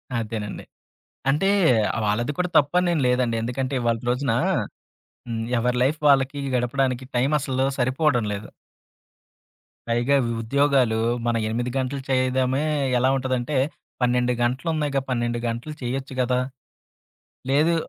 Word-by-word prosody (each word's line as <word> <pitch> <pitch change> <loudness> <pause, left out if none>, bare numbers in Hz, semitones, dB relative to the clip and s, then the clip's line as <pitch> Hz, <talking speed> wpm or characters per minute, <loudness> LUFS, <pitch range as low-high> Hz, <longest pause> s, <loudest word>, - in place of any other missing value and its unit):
అదేనండి. 110 -2 -4 0.7
అంటే 150 +8 +2 0.6
వాళ్ళది 110 +6 0
కూడా 180 0 0
తప్పనేం 175 +4 +3
లేదండి. 125 -2 +1
ఎందుకంటే, 130 +3 -3
ఇవాళ్టి 115 -1 0
రోజునా, 125 -2 +1 0.9
హ్మ్. 115 -1 -3 0.2
ఎవరి 125 +1 0
లైఫ్ 145 +5 +1
వాళ్ళకి 140 0 +3 0.2
గడపడానికి 125 +1 0
టైం 130 +3 +2
అసలు 130 -1 -1
సరిపోవడం 130 -1 +2
లేదు. 100 +1 -6 1.4
పైగా 120 +4 +2
ఉ - - -2
ఉద్యోగాలు 135 -1 +2 0.3
మనం 120 -1 +1
8 120 +3 -2
గంటలు 135 +1 -2
చేయదమే 130 +1 +1 0.3
ఎలా 130 +2 +3
ఉంటదంటే, 130 +1 -1 0.4
12 125 0 +2
గంటలు 125 +7 -1
ఉన్నాయిగా 145 -3 0
12 120 -1 -1
గంటలు 120 +6 -4
చేయొచ్చు 135 +2 -3
కదా! 125 0 +1 1.1
లేదు 155 +5 +3
130 Hz, 115 wpm, -24 LUFS, 120-140 Hz, 1.4 s, తప్పనేం